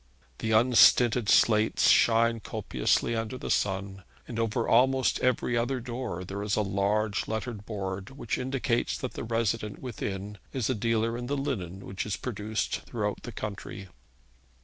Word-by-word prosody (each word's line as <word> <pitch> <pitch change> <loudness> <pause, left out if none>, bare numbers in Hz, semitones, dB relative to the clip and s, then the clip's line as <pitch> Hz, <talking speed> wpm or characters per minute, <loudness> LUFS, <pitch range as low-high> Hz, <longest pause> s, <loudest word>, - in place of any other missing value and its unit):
The 110 - -2
unstinted 120 0 +5
slates 110 -1 +4
shine 115 0 +4
copiously 80 - 0
under 115 +2 -3
the - - -4
sun, 95 -1 -1 0.2
and 115 -2 -5
over 115 +1 0
almost 130 +2 +3
every 125 -1 +1
other 120 +3 0
door 120 -6 -5
there 95 +2 -5
is 105 -1 0
a 105 - +1
large 100 +1 0
lettered 110 -1 -4
board 95 -3 -4
which 130 -4 -4
indicates 125 -2 -1
that 130 - -5
the - - -5
resident 115 -2 -1
within 105 -5 -5
is 130 -2 0
a - - +2
dealer 115 0 0
in 120 0 -5
the 145 +2 -1
linen 95 - -4
which 95 +2 -4
is 105 - -2
produced 110 -2 -2
throughout 105 -4 -3
the 120 - -7
country. 100 -3 -6
110 Hz, 155 wpm, -28 LUFS, 100-120 Hz, 0.2 s, unstinted